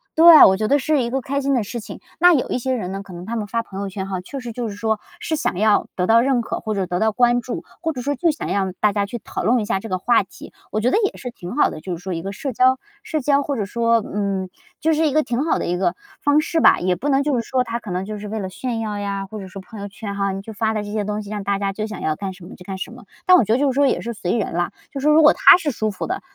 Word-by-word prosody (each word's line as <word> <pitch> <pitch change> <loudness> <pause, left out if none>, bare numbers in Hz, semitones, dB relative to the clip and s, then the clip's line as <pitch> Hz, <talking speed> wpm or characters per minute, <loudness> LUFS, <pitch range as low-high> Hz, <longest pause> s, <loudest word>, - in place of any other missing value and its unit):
对， 330 -1 +10
我 190 - +5
觉 215 +1 -1
得 285 - +4
是 290 +1 +1
一 235 - -1
个 265 +2 -1
开 280 +1 -2
心 275 0 +1
的 240 - +1
事 235 +4 -5
情。 215 - -9 0.2
那 355 +1 +7
有 260 - 0
一 - - -1
些 260 +2 -1
人 185 -6 -4
呢， 195 0 -4
可 200 -2 -12
能 175 +1 -8
他 230 +3 -4
们 215 -2 -3
发 230 +2 -1
朋 195 -3 -7
友 200 - -3
圈 190 0 -5
哈， 190 -2 -3
确 275 +10 -7
实 245 -2 -6
就 235 0 -4
是 200 - -7
说 220 +1 -1 0.2
是 320 - -2
想 240 - -1
要 210 +1 +3
得 180 - 0
到 225 +3 +5
认 260 -1 +2
可， 230 - -4
或 215 -1 -3
者 195 -2 0
得 180 0 -2
到 220 0 +2
关 240 +2 +3
注， 240 +1 -5 0.2
或 325 - 0
者 255 - -6
说 285 +2 0
就 330 +5 +1
想 300 - -3
让 190 -1 -1
大 210 -2 +3
家 200 -1 0
去 240 - -5
讨 - - -4
论 245 +3 +3
一 215 - -2
下 205 -2 0
这 225 - -8
个 185 - 0
话 235 +5 +3
题， 195 - -12 0.2
我 215 - -1
觉 240 +4 +1
得 - - +3
也 400 - -1
是 250 -2 -6
挺 180 -2 -8
好 295 - +3
的， 155 - -8
就 180 -2 -4
是 175 - -15
说 190 -1 -3
一 165 - -3
个 195 +3 -5
社 265 +6 -5
交 255 +3 +4 0.2
社 310 - -3
交 280 +1 +3
或 285 0 -2
者 215 -5 -2
说， 230 +1 +1
嗯， 195 -2 -2 0.3
就 320 0 +2
是 315 +1 +2
一 285 - -1
个 310 +1 +3
挺 245 +2 -1
好 325 - +2
的 - - -3
一 175 - -1
个 190 - 0 0.3
方 290 +1 +4
式 325 +1 -1
吧。 - - +6
也 180 0 +1
不 290 - -3
能 275 0 +3
就 290 -2 +1
是 240 - +1
说 255 -1 +1
他 235 -1 -4
可 225 - -10
能 180 +1 -2
就 210 +1 -6
是 210 - -7
为 220 +2 -4
了 190 -3 -3
炫 240 +3 -4
耀 210 -2 -3
呀， 200 -1 -3
或 215 +2 -8
者 190 - -8
说 190 +1 -9
朋 210 +3 -11
友 200 - -5
圈 200 0 -7
哈， 200 -1 0
你 195 +1 -5
去 220 - -8
发 220 +1 -1
的 210 - -1
这 205 - -7
些 215 - 0
东 210 +1 -3
西， 205 - -10
让 205 -2 -4
大 200 0 0
家 195 0 -2
就 215 +2 -3
想 215 - -7
要 155 - 0
干 195 +2 -5
什 180 -2 -13
么 180 - -11
就 180 - -13
干 190 +1 -6
什 190 - -6
么。 245 +1 -12 0.2
但 365 - +7
我 305 - +5
觉 215 - -2
得 - - +3
就 280 -1 +2
是 - - -6
说 280 0 +4
也 - - +1
是 235 - -5
随 180 -4 -2
人 210 - -2
啦， 175 +1 0 0.2
就 275 - -5
是 275 - -4
说 300 - +6
如 320 - +6
果 300 - +8
他 - - +8
是 315 -5 -2
舒 215 -3 -1
服 195 - -5
的， 375 +2 -3
220 Hz, 365 characters per minute, -21 LUFS, 195-260 Hz, 0.3 s, 对